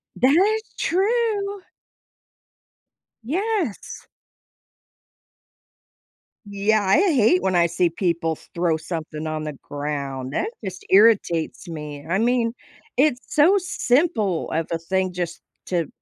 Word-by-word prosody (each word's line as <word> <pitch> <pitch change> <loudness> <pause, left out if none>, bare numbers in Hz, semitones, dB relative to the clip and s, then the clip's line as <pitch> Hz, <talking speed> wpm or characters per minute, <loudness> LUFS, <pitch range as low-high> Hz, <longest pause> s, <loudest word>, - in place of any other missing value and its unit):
That's 390 - +2
true. 405 +1 0 1.6
Yes. 365 - -2 2.4
Yeah, 205 +1 +1
I 190 +7 +4
hate 220 - +4
when 190 -1 0
I 170 -1 +5
see 170 +1 +1
people 170 -2 -1 0.2
throw 170 -2 +1
something 155 -1 -5
on 155 0 -3
the 150 -1 -4
ground. 140 -2 -4
That 425 - -1
just 190 -2 -7
irritates 195 -5 +3
me. 150 -3 -7
I 190 - +2
mean, 235 0 +1 0.4
it's 270 -2 +3 0.2
so 320 +6 +6
simple 245 - 0
of 165 0 -1
a 165 - 0
thing 185 +2 -1
just 175 -1 -4 0.3
to, 170 -5 0
190 Hz, 110 wpm, -23 LUFS, -, 2.4 s, so